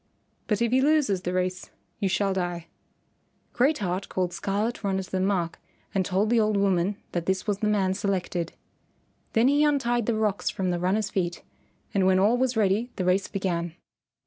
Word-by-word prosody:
But 210 +1 +1
if 235 - 0
he 260 +1 +4
loses 285 -10 +2
the 180 - -2
race 185 0 -2 0.3
you 200 -3 +1
shall 195 +1 +1
die." 175 -2 -3 0.9
Great 275 +5 +3
Heart 190 -1 -3
called 180 -1 -1
Scarlet 210 +6 -2
Runner 190 -1 0
to - - -14
the 190 - 0
mark 185 -3 0 0.3
and 195 - +2
told 195 +4 0
the 240 - +4
old 215 -1 +2
woman 195 0 +1
that 175 -1 -3
this 190 0 0
was 205 -2 -1
the 215 - 0
man 195 -3 +2
selected. 185 -3 -2 0.8
Then 225 +2 +4
he 290 +2 +4
untied 240 -6 +1
the 235 - +2
rocks 215 -2 0
from 185 -2 -1
the 175 - -1
runner's 200 +4 0
feet, 175 -2 -2 0.5
and 190 -2 +3
when 190 0 +4
all 205 +5 +4
was 255 -1 0
ready 215 +3 +2
the 185 - -2
race 185 +2 +2
began. 175 -4 -2
195 Hz, 190 wpm, -26 LUFS, 185-220 Hz, 0.9 s, he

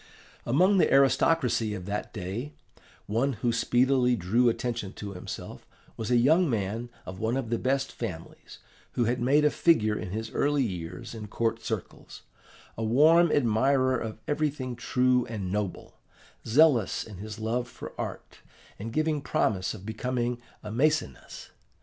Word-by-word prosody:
"Among 185 +11 +4
the - - +3
aristocracy 130 -5 +3
of 90 -3 -7
that 100 +1 -4
day, 110 +8 -5 0.5
one 120 +6 0
who 120 +1 -1
speedily 125 +1 +3
drew 115 +5 +2
attention 115 -4 -3
to 100 -1 -7
himself 90 - -8 0.3
was 110 - -4
a 125 - +3
young 155 +8 +4
man 110 +1 -2 0.2
of 95 0 -8
one 115 +4 0
of 120 -4 -4
the 115 - +1
best 135 +1 0
families 90 -9 -8 0.4
who 120 - +1
had 120 +2 0
made 145 +5 +4
a 150 - +4
figure 110 -11 +3
in 95 - -5
his 110 +3 -4
early 145 -1 +1
years 95 +3 -5
in 110 -2 -7
court 115 +1 -1
circles, 110 -5 -6 0.5
a 115 - -4
warm 155 +9 +5
admirer 130 +1 +2
of 110 -3 -4
everything 145 -4 -1
true 125 +1 +1
and 100 -6 -4
noble, 100 -2 -4 0.5
zealous 125 - +4
in 105 -4 -11
his 110 +3 -7
love 115 +3 -2
for - - -10
art, - - -7 0.4
and 115 +3 -5
giving 155 0 0
promise 95 -7 0
of 100 -2 -11
becoming 120 +2 -2 0.2
a 105 - -6
Maecenas. 140 - -1
120 Hz, 155 wpm, -28 LUFS, 110-135 Hz, 0.5 s, warm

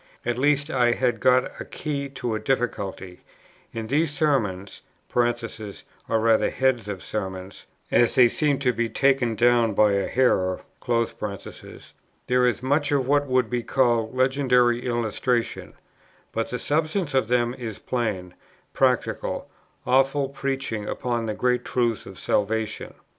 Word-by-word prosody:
At 120 0 -1
least 145 +2 +2
I 120 -2 +3
had 120 -3 0
got 130 0 +2
a - - -3
key 140 -2 -4
to 125 -4 -4
a 110 - -1
difficulty; 100 -8 -3 0.5
in 115 -1 -5
these 145 +7 +1
Sermons, 120 -11 -1 0.3
(or 120 - +4 0.9
rather 110 0 +3
heads 130 -5 0
of 100 -2 -5
sermons, 95 -2 -6 0.2
as 120 - +3
they 125 -2 +7
seem 145 +3 +1
to 125 -2 +2
be, 115 0 -1
taken 130 -4 +2
down 120 -1 +3
by 105 0 +5
a 100 0 0
hearer,) 95 -8 +1 1.6
there 125 0 +3
is 125 0 -1
much 145 +2 +1
of 135 -3 +1
what 145 0 +2
would 130 -2 +2
be 125 -1 0
called 120 -2 +1
legendary 125 -2 +2
illustration; 120 0 -1 0.6
but 115 0 -2
the 125 - -3
substance 155 - -1
of 130 -4 +2
them 120 0 +1
is 115 -5 -6
plain, 105 -8 -3 0.4
practical, - - 0 0.3
awful 135 +2 +2
preaching 135 -6 -3
upon 120 -2 -2
the 105 - -2
great 125 +1 +1
truths 120 -3 -1
of 95 - -10
salvation. 110 +1 -1
125 Hz, 140 wpm, -24 LUFS, 110-135 Hz, 1.6 s, they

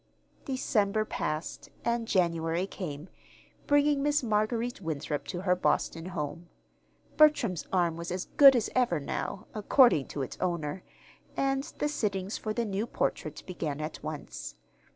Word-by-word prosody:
December 215 -5 +1
passed, 155 -6 -4 0.2
and 235 -1 0
January 170 -2 +1
came, 160 -5 -6 0.6
bringing 290 0 +4
Miss 290 -1 +2
Marguerite 225 +2 0
Winthrop 150 -3 -3
to 175 -2 -4
her 180 -1 +2
Boston 165 -2 0
home. 170 -1 -5 0.7
Bertram's 270 - +4
arm 175 -3 +1
was 170 +1 -5
"as 180 +1 -2
good 275 -2 +9
as 230 -3 +1
ever" 240 -11 +2
now, 195 +8 -4
according 215 - +4
to 140 - -3
its - - -7
owner; 170 -1 -2 0.6
and 270 0 +1
the 295 - 0
sittings 200 -8 -2
for 215 - -3
the 235 +2 -1
new 205 +2 -2
portrait 155 -9 -2
began 155 -5 -4
at 155 +1 -5
once. 150 - -6
190 Hz, 140 wpm, -29 LUFS, 165-235 Hz, 0.7 s, good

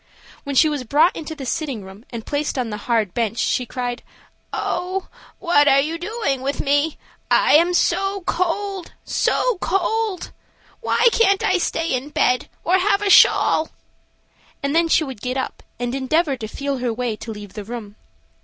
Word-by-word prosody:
When 280 -1 -3
she 310 - +6
was 295 -4 -2
brought 300 +8 +3
into 315 0 -6
the 275 -3 -7
sitting 260 -5 -3
room 190 +5 -13
and 230 -2 -7
placed 290 -1 -2
on 245 -3 -2
the 210 - -4
hard 220 -6 +1
bench, 230 -1 -1
she 250 +1 0
cried: 245 0 -4 0.5
"Oh, 370 +2 -3 0.3
what 315 -5 +3
are 275 - +6
you 320 +4 -1
doing 360 - -2
with 275 +2 -2
me? 290 +2 +1 0.3
I - - +4
am 335 +4 +5 0.5
cold, 370 +1 -2
so - - +1
cold. 390 +2 -1 0.5
Why 465 - +1
can't 395 -4 +3
I 370 0 +2
stay 330 -2 -1
in 255 +3 -2
bed 250 -4 +1
or 370 +3 +3
have 400 +2 +2
a 400 - +2
shawl?" 315 - +5 0.9
and 280 +2 -1
then 335 0 +4
she 325 - +3
would 265 -8 -7
get 255 +1 -2
up 260 - -4 0.2
and 245 0 -2
endeavor 275 +3 +1
to 225 -4 -6
feel 275 +4 -3
her 245 -1 -1
way 235 -1 -2
to 225 - -7
leave 205 -3 -9
the 210 - -6
room. 215 -2 -8
285 Hz, 175 wpm, -21 LUFS, 245-345 Hz, 0.9 s, she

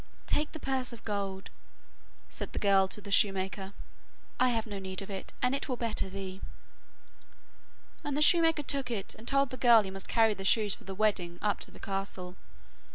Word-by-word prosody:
'Take 300 - 0
the 315 - -7
purse 265 -3 -1
of 235 - -10
gold,' 200 -2 -3 0.8
said - - -6
the - - -6
girl 195 -2 +4
to 200 - -4
the 200 0 -9
shoemaker, 195 -1 +1 0.7
'I 255 - +5
have 225 -2 0
no 205 -3 -5
need 190 -1 -5
of 200 - -9
it, 195 - -5
and 250 +1 +3
it 275 - -2
will 250 - -1
better 225 -5 -2
thee.' 190 0 -6 1.6
And 290 -1 -2
the - - +1
shoemaker 325 -2 +5
took 275 -2 -1
it 205 -5 -3
and 220 +2 -14
told 275 -1 +2
the 255 - -5
girl 235 -4 +7
he 190 - -6
must 195 0 -5
carry 225 -2 +4
the 195 - -7
shoes 205 0 +3
for - - -10
the 195 0 -6
wedding 185 -4 0
up 210 -1 +1
to - - -6
the - - -14
castle. 195 -2 -3
210 Hz, 200 wpm, -31 LUFS, 195-250 Hz, 1.6 s, girl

